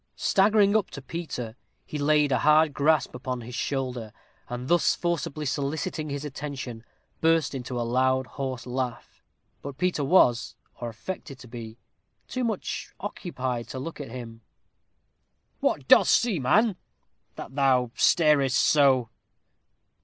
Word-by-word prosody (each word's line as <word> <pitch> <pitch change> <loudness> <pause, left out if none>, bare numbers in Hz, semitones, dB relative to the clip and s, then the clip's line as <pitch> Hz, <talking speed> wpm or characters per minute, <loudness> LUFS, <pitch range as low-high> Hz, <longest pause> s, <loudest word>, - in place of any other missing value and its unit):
Staggering 205 +1 +3
up 215 - +2
to 140 - -8
Peter, 130 -8 -5 0.3
he 150 - -5
laid 150 0 +3
a 130 - +2
hard 155 +1 +4
grasp 155 +2 +2
upon 125 0 -4
his 120 +2 -9
shoulder, 125 -4 -3 0.4
and, 125 +1 -5
thus 175 -1 +3
forcibly 165 -3 -2
soliciting 150 +3 -2
his 140 +1 -4
attention, 135 -5 -6 0.4
burst 165 -2 +2
into 125 -2 -4
a - - 0
loud 130 +2 +2
horse 130 -2 -5
laugh. 125 -1 -4 0.4
But 140 -1 -7
Peter 180 -2 0
was, 135 -7 +3 0.2
or 120 - -4
affected 135 - -7
to 130 - -13
be, 115 -1 -9 0.5
too 255 - -3
much 220 -5 -3
occupied 130 - -4
to 125 - -7
look 155 +3 -6
at 140 - -7
him. 115 -2 -8 1.2
"What 130 - 0
dost - - +7
see, 230 -8 +1
man, 205 - +3 0.6
that 130 - -8
thou 130 -3 +2
starest 145 -5 +4
so?" 135 -5 +4
135 Hz, 140 wpm, -26 LUFS, 125-155 Hz, 1.2 s, dost